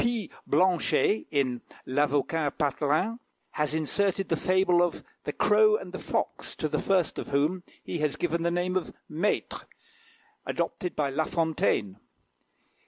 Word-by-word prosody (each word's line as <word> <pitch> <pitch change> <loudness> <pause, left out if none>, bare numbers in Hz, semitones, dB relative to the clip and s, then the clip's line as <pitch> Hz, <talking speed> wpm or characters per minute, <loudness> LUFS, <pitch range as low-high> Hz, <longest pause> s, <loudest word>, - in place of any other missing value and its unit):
P. 235 -5 -1 0.2
Blanchet, 185 +3 +2
in 130 -5 0 0.2
"L'Avocat 145 +2 0
Patelin," 150 - 0 0.3
has 150 0 0
inserted 195 +5 +1
the 165 - +2
fable 185 +1 +3
of 175 -1 0 0.2
"The - - -1
Crow 430 -1 +4
and - - -10
the - - -5
Fox," - - -3
to - - -1
the - - -1
first 185 -5 +1
of - - -5
whom 150 +6 +1 0.2
he 170 - -4
has 150 -2 0
given 170 -1 -1
the 170 - +1
name 175 +1 -1
of 185 - -2
Maitre, 170 +7 -2 0.8
adopted 180 -4 -3
by 145 -2 0
La 155 +3 0
Fontaine. 150 - 0
165 Hz, 145 wpm, -28 LUFS, 150-185 Hz, 0.8 s, Crow